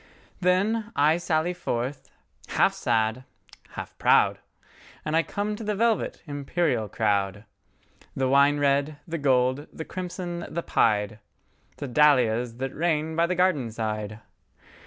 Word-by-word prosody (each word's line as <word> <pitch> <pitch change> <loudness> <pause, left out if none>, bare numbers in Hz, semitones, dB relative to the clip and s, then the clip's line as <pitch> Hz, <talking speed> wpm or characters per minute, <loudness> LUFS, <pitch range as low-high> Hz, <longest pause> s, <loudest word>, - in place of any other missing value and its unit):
Then, 205 +5 +1
I 150 +3 +4
sally 170 0 0
forth, 135 -3 -4 0.4
half - - +2
sad, 115 +1 0 0.5
half - - -7
proud, - - +4 0.7
And 155 +1 -1
I 165 - +5
come 205 +5 -3
to 220 - -7
the 210 0 -1
velvet, 225 +1 0
imperial 145 - -1
crowd, 100 -1 0 0.7
The 135 -1 0
wine 140 +2 +4
red, 145 +1 +1
the 165 0 -3
gold, 130 0 +2
the 160 - -7
crimson, 180 -1 -5
the 170 - -3
pied,—The 105 +5 -2
dahlias 125 -4 +3
that 135 +1 -4
reign 160 -1 0
by 170 +1 +3
the 180 - -1
garden 175 -9 +2
side. 110 -1 -4
145 Hz, 130 wpm, -26 LUFS, 120-170 Hz, 0.7 s, I